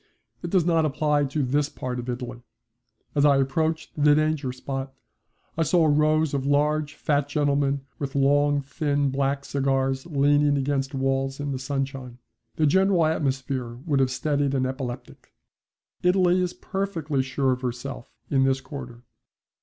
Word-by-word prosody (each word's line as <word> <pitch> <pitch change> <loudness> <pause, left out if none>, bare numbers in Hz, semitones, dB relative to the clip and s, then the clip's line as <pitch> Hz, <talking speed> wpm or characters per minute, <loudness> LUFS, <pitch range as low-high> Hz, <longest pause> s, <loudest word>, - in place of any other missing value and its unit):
It 175 - -4
does 180 -2 +2
not 165 -2 +3
apply 150 0 +1
to 140 +2 -1
this 145 +3 +1
part 125 -3 -5
of 125 +1 -6
Italy. 125 0 -5 0.7
As 145 - +2
I 145 -2 +5
approached 155 +4 0
the 145 0 +4
danger 155 -3 0
spot 135 +1 -5 0.6
I 165 - -1
saw 165 +1 +3
rows 155 0 +3
of 140 -2 -1
large, 150 +2 +1
fat 145 -1 0
gentlemen 140 -1 +1 0.2
with 140 0 -4
long 145 +1 +3
thin 140 0 -1
black 140 +1 -1
cigars 135 0 0
leaning 145 -1 +3
against 135 0 -1
walls 135 0 -1
in 145 0 -3
the 130 - -3
sunshine. 135 -2 -4 0.4
The 155 - +2
general 190 +1 +3
atmosphere 135 -5 -1
would 145 -5 +1
have 130 -1 +3
steadied 140 +1 0
an 130 -1 +1
epileptic. 130 -1 -6 0.7
Italy 180 0 +3
is 180 0 -2
perfectly 165 -8 -2
sure 130 0 0
of 125 0 -2
herself 125 +1 -5 0.2
in 135 -2 +2
this 135 0 +2
quarter. 125 -4 -9
140 Hz, 155 wpm, -25 LUFS, 135-150 Hz, 0.7 s, I